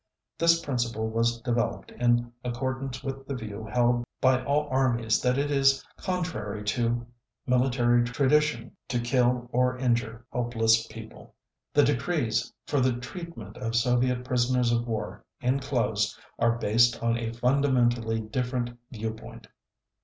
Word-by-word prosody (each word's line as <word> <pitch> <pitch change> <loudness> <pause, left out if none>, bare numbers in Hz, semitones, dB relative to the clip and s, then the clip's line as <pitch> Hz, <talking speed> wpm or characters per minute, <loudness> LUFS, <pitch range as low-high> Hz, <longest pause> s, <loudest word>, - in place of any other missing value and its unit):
This 165 0 +5
principle 120 -6 -2
was 115 +1 +1
developed 120 -2 -1
in 120 0 +1
accordance 130 +2 -3
with 135 0 -5
the 140 - -3
view 110 -2 -6
held 120 0 +2 0.2
by 130 -1 +3
all 145 +1 +1
armies 120 -4 +2
that 125 +1 +2
it 145 +1 0
is 135 -1 +3
contrary 135 - -3
to 120 +3 0 0.4
military 125 -1 +3
tradition 130 0 +1
to 125 -1 -1
kill 120 0 +1
or 125 +1 +2
injure 120 -2 -1
helpless 115 -2 +2
people.... 110 0 -12 0.4
The - - +6
decrees 125 -4 0
for 145 - 0
the 130 -1 +3
treatment 125 - -8
of 115 -2 -3
Soviet 125 +1 +2
prisoners 125 -1 +2
of 120 0 0
war 110 -2 -4 0.2
enclosed 125 -5 0 0.2
are 115 0 +2
based 115 +1 +3
on 115 0 +2
a 115 -1 -3
fundamentally 120 -2 +1
different 125 +2 -2 0.2
view 110 -2 -3
point." 110 - -11
120 Hz, 135 wpm, -27 LUFS, 115-130 Hz, 0.4 s, The